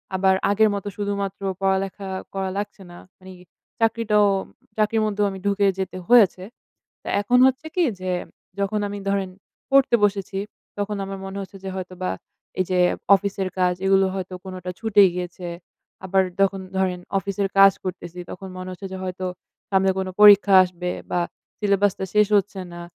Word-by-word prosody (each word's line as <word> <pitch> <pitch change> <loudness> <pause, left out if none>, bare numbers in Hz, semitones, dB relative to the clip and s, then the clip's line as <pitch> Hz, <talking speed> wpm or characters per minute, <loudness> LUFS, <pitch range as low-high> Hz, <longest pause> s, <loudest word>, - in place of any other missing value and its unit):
আবার 190 0 +3 0.2
আগের 215 +1 +4
মত 200 - -5
শুধুমাত্র 200 -1 -3 0.2
পড়ালেখা 195 0 -1 0.2
করা 190 -1 -2
লাগছে 205 -1 -5
না। 175 - -12 0.2
মানে 185 0 -12 0.5
চাকরিটাও 220 -2 +3 0.5
চাকরির 215 +1 +2
মধ্যেও 205 -1 0
আমি 190 - -7
ঢুকে 200 0 +2
যেতে 185 -1 -3
হয়েছে। 205 -6 +5 0.6
তা - - -12
এখন 245 +5 +2
হচ্ছে 265 +4 -2
কি? 360 - +3 0.2
যে, 185 0 -3 0.5
যখন 200 +2 0
আমি 205 0 -6
ধরেন 195 -1 0 0.4
পড়তে 275 -3 +5
বসেছি, 195 -1 -2 0.4
তখন 205 +1 -2
আমার 195 0 -6
মনে 195 +1 -6
হচ্ছে 195 +1 -9
যে 190 - -4
হয়তোবা 185 0 -4 0.5
এই - - +4
যে 180 - +2 0.4
অফিসের 195 -1 -2
কাজ 180 0 +3
এগুলো 195 0 +4
হয়তো 185 -1 -5
কোনটা 185 -1 -6
ছুটে 215 -3 +5
গিয়েছে। 180 0 -5 0.6
আবার 190 0 +3 0.2
যখন 195 0 +2 0.2
ধরেন 185 -1 0 0.2
অফিসের 200 0 -2
কাজ 195 0 +9
করতেছি 180 -1 -6
তখন 190 +1 -8
মনে 185 0 -6
হচ্ছে 190 +2 -7
যে - - -4
হয়তো 185 0 -4 0.5
সামনে 190 0 +3
কোনো 190 -1 -2
পরীক্ষা 205 -1 +8
আসবে। 180 0 -4 0.2
বা 175 - +1 0.4
সিলেবাসটা 200 -2 +1
শেষ 210 -1 +4
হচ্ছে 200 0 -2
না। 175 - -8
195 Hz, 160 wpm, -23 LUFS, 185-205 Hz, 0.6 s, কাজ